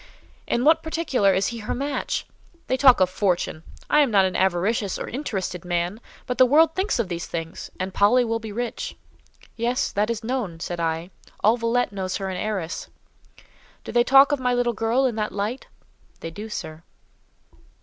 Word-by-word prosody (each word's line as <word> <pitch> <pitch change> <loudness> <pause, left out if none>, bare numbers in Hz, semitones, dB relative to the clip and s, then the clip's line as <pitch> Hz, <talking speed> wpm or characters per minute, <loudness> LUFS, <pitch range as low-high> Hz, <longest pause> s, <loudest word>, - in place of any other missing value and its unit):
"In 240 +2 0
what 315 +2 +5
particular 320 -11 +1
is 190 +1 +1
he 235 - -6
her 210 - -3
match? 280 +2 -2 0.4
They - - 0
talk 260 -3 +6
of 185 - +6
fortune! 180 -4 -1 0.3
I 300 - +4
am 290 -3 +4
not 195 -3 +4
an 185 - -2
avaricious 190 +2 +1
or - - -5
interested 195 - -4
man, 175 +4 -2 0.2
but 250 -1 -4
the 255 - +8
world 320 +5 +5
thinks 380 +3 0
of 235 -5 0
these 170 -1 -4
things—and 170 +3 -6
Polly 240 +5 +4
will 230 0 -1
be 220 -1 -7
rich." 240 +2 -4 0.6
"Yes, 240 +2 0
that 210 +2 0
is 230 -1 -3
known," 220 -9 -3
said 175 +1 -4
I: 165 +2 -2 0.3
"all 220 +3 +5
Villette 240 0 0
knows 190 -2 -3
her 195 -1 -4
as - - -4
an 180 - -4
heiress." 195 -6 -3 1.0
"Do - - -7
they 240 0 +4
talk 270 +3 +6
of 290 - +1
my 250 -1 +1
little 245 -1 +1
girl 230 +4 +1
in 250 - +1
that 215 -1 -1
light?" 210 +6 -3 0.5
"They 165 - -5
do, 210 +5 -8
sir." 155 -6 -6
220 Hz, 190 wpm, -24 LUFS, 185-250 Hz, 1.0 s, the